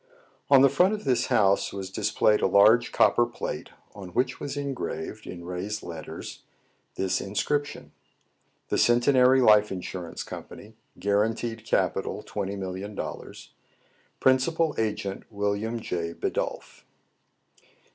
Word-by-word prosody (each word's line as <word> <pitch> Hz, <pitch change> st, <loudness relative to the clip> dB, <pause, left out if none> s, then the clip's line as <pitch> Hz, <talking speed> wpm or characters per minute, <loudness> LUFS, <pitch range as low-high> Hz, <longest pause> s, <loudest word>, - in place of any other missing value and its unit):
On 135 Hz, -1 st, +7 dB
the -, -, +8 dB
front 185 Hz, +9 st, +3 dB
of 210 Hz, -, -8 dB
this 125 Hz, -3 st, +1 dB
house 100 Hz, -2 st, +2 dB
was 95 Hz, -1 st, -6 dB
displayed 105 Hz, +1 st, +2 dB
a -, -, +3 dB
large 105 Hz, +5 st, +5 dB
copper 120 Hz, 0 st, +4 dB
plate, 120 Hz, -, -5 dB, 0.2 s
on 95 Hz, -3 st, -9 dB
which 130 Hz, +1 st, 0 dB
was 145 Hz, 0 st, -5 dB
engraved, 140 Hz, -2 st, -5 dB
in 85 Hz, -1 st, -8 dB
raised 90 Hz, +4 st, -4 dB
letters, 80 Hz, -2 st, -8 dB, 0.5 s
this 95 Hz, -1 st, 0 dB
inscription, 145 Hz, +9 st, -2 dB, 0.4 s
— -, -, -44 dB
«THE -, -, +1 dB
CENTENARY 125 Hz, +2 st, +4 dB
LIFE 105 Hz, -2 st, +5 dB
INSURANCE 90 Hz, -2 st, -6 dB
COMPANY. -, -, -10 dB, 0.2 s
Guaranteed 110 Hz, +2 st, -1 dB
Capital, -, -, -1 dB
$20,000,000. 100 Hz, 0 st, -6 dB, 0.7 s
Principal 150 Hz, +5 st, +2 dB
Agenty 105 Hz, -3 st, -3 dB
William 105 Hz, +2 st, -2 dB
J. 85 Hz, -5 st, -4 dB
Bidulph." -, -, -4 dB
105 Hz, 115 wpm, -26 LUFS, 100-125 Hz, 0.7 s, the